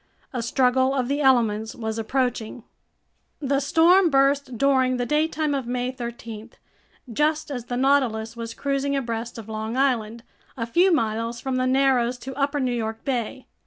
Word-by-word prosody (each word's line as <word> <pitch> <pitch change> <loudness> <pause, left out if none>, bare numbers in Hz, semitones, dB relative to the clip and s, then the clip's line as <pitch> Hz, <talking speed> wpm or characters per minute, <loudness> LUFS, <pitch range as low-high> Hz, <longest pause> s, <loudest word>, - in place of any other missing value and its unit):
A 245 - -2
struggle 260 +2 +2
of 255 -3 0
the 285 +2 -1
elements 225 -5 +2
was 220 -1 -4
approaching. 245 -1 -2 0.8
The 275 -2 0
storm 335 +6 +4
burst 275 -2 +2
during 260 -1 +2
the 245 - -1
daytime 305 +1 0
of 270 -4 -2
May 250 +1 -2
13, 235 -3 -7 0.6
just 300 +2 0
as 245 -4 -5
the 245 0 -3
Nautilus 245 -5 +1
was 230 0 -6
cruising 280 0 -1
abreast 235 -3 -3
of 220 -2 -9
Long 220 +2 -4
Island, 235 -4 0 0.3
a 230 - -2
few 350 +11 +3
miles 230 -4 0
from 265 -1 -2
the 255 0 +1
narrows 255 -2 +2
to 265 +2 -8
Upper 280 +2 -1
New 255 -2 0
York 225 -1 -4
Bay. 255 -1 -3
255 Hz, 160 wpm, -24 LUFS, 230-275 Hz, 0.8 s, storm